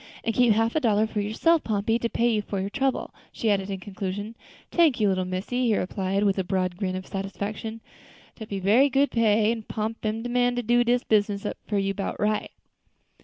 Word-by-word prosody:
"And 225 - 0
keep 245 -2 +4
half 225 +2 +1
a - - +4
dollar 220 -5 +2
for 215 -1 -2
yourself, 300 +11 +2
Pompey, 220 +2 0
to 235 - -1
pay 235 - +1
you 210 - +1
for 200 -1 -4
your 195 +1 -3
trouble," 270 +1 -1 0.2
she 220 - 0
added 195 -1 0
in 195 -1 -3
conclusion. 200 +3 -5 0.4
"Tank 320 -8 +3
you, 210 - +3
little 185 -1 0
missy," 200 +8 -2
he 220 - +3
replied, 195 +1 -1
with 195 -1 +2
a - - +1
broad 185 -1 -1
grin 185 -1 -2
of 185 0 -5
satisfaction; 205 +3 -5 0.5
"dat 220 -2 -9
be 200 - -3
berry 220 +9 +4
good 275 +2 +2
pay, 220 -1 +3
and 225 -2 -5
Pomp 220 +1 -4
am 220 +1 -2
de 245 - -4
man 245 0 +2
to 245 - -2
do 240 +2 +3
dis 245 +1 +1
business 205 -2 +1
up - - -3
for 210 - -1
you 195 0 0
'bout 195 0 -4
right." 210 0 0
215 Hz, 220 wpm, -25 LUFS, 195-235 Hz, 0.5 s, keep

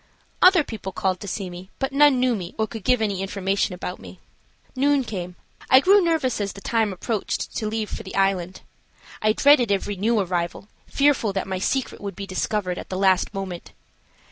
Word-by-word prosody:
Other 365 -3 +7
people 210 -7 -7
called 185 -1 -1
to 200 - -8
see 195 0 -4
me, 180 +1 -10
but 270 0 -2
none 285 -2 +5
knew 250 -1 +2
me 180 -3 -7
or 220 - +1
could 220 -2 -8
give 250 -3 +2
any 200 -3 -1
information 195 -1 -1
about 180 0 -6
me. 185 - -12 0.6
Noon 280 +1 +2
came. 180 -6 -6 0.3
I 260 - +8
grew 390 +6 +5
nervous 305 -10 0
as 200 -2 -2
the 195 - -10
time 220 0 0
approached 200 +3 -3
to 215 - -2
leave 215 0 -2
for - - -5
the 190 - -9
Island. 190 -2 0 0.6
I 215 0 +3
dreaded 260 -4 +5
every 200 +1 -1
new 220 +4 +1
arrival, 180 +1 -2 0.2
fearful 275 -7 +2
that 190 - -2
my 190 -1 -3
secret 265 +6 -2
would 200 -1 -5
be 200 - -6
discovered 185 -1 -2
at - - -9
the 185 - -3
last 190 -1 +2
moment. 195 -3 -6
200 Hz, 195 wpm, -23 LUFS, 190-245 Hz, 0.6 s, I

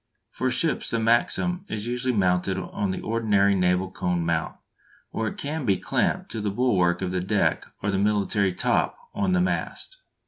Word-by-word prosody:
For 130 - -1
ships 160 +4 0
the 115 - 0
Maxim 120 +11 +1
is 105 0 -3
usually 125 +2 -1
mounted 90 -1 +1
on 100 +2 -3
the 95 - -3
ordinary 105 -3 +2
naval 90 0 +1
cone 90 -2 -1
mount, 80 -1 -1 0.6
or 110 - -2
it - - -5
can 150 +1 -3
be 100 -6 +2
clamped - - -1
to 110 - -4
the 105 - -1
bulwark 95 -6 +2
of 90 - -2
the 90 0 -1
deck 95 +3 0 0.2
or 100 - +1
the 95 - 0
military 100 -1 +2
"top" 90 - 0 0.2
on 190 -2 0
the 180 - +3
mast. - - -2
105 Hz, 180 wpm, -25 LUFS, 95-120 Hz, 0.6 s, the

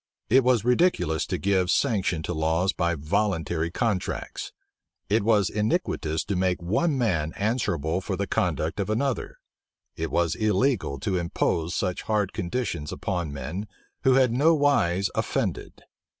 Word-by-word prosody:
It 130 +2 +6
was 120 -3 +2
ridiculous 125 - +2
to - - -1
give 95 -2 +1
sanction 95 - +1
to - - -3
laws 80 +5 +1
by 85 -1 0
voluntary 85 -1 -1
contracts: 105 0 -2 0.6
it 110 +3 +3
was 105 -2 +3
iniquitous 105 - -1
to 100 - -2
make 90 0 +1
one 110 - 0
man 85 -11 0
answerable 95 - -1
for - - -3
the - - -2
conduct 80 +5 -1
of 100 0 -1
another: 125 +4 -1 0.6
it 80 0 -3
was 85 -2 +1
illegal 110 - +1
to 95 +2 0
impose 85 0 -1
such 90 -2 -1
hard 105 -3 0
conditions 85 - -3
upon 90 -5 -3
men 75 +9 -5 0.4
who 130 -1 +5
had 130 -3 +4
nowise 140 - +3
offended. - - -2
95 Hz, 140 wpm, -26 LUFS, 85-115 Hz, 0.6 s, It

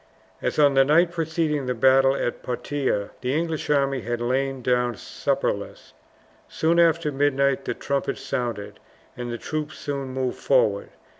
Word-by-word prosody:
As - - -2
on 145 -2 +5
the 135 0 +6
night 165 +5 +4
preceding 160 -4 -1
the 125 - -1
battle 135 +2 +4
of 120 - -2
Poitiers, 125 -4 -2
the 130 +2 -1
English 165 -2 -2
army 140 -2 +2
had 120 0 -3
lain 130 +2 -1
down 125 -1 +1
supperless. - - -3 0.6
Soon 165 +2 +1
after 165 -2 +3
midnight 140 -1 +1
the - - -2
trumpets 140 -1 -2
sounded, 105 -5 -4 0.4
and 120 -1 -5
the 120 - -3
troops 155 +4 -4
soon 140 -2 -4
moved 130 -1 -3
forward. - - +2
135 Hz, 150 wpm, -24 LUFS, 125-150 Hz, 0.6 s, the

